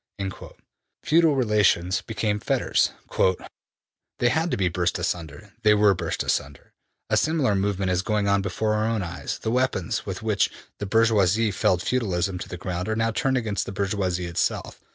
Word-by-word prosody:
'' - - -43
Feudal 160 -1 +4
relations 100 -7 +2
became 105 0 -2
fetters: - - +1 0.2
``They 95 +5 -3
had 160 +6 +1
to - - -1
be 95 -2 +1
burst 90 0 0
asunder; 90 +3 -4
they 105 -2 +5
were 105 -1 +5
burst 90 - -3
asunder.... 70 +1 -3 0.4
A - - +4
similar 155 -9 +2
movement 100 -1 0
is 90 0 +1
going 105 0 0
on 100 0 +3
before 105 +2 -1
our 110 +1 +1
own 115 -3 0
eyes.'' 85 0 -5
``The 110 - -1
weapons 125 -8 0
with - - -6
which - - +2 0.3
the 105 - -3
bourgeoisie 110 -1 +3
felled 90 -1 +1
feudalism 95 -7 -1
to - - -7
the 90 - -6
ground 90 +2 -4
are 110 - 0
now 115 0 +1
turned 135 +1 0
against 110 -4 -2
the - - -4
bourgeoisie 95 -3 -1
itself. 85 -1 -2
100 Hz, 175 wpm, -25 LUFS, 90-115 Hz, 0.4 s, they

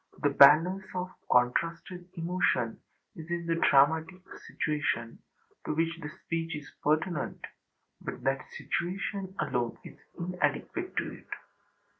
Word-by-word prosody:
This 145 -1 +3
balance 165 +7 +7
of 180 0 -3 0.2
contrasted 165 +8 +1
emotion 165 -9 0 0.3
is 160 0 -9
in 170 0 -2
the 165 - +1
dramatic 160 +4 +3 0.2
situation 145 -7 -1 0.4
to - - -2
which 165 +1 +1
the 150 - -5
speech 165 +1 -4
is 150 -1 -9
pertinent, 155 +3 0 0.6
but - - -6
that 135 0 -1
situation 190 +2 -3
alone 125 -5 -1
is - - -12 0.2
inadequate 180 - -2
to - - -2
it. - - -23
165 Hz, 120 wpm, -30 LUFS, 145-180 Hz, 0.6 s, balance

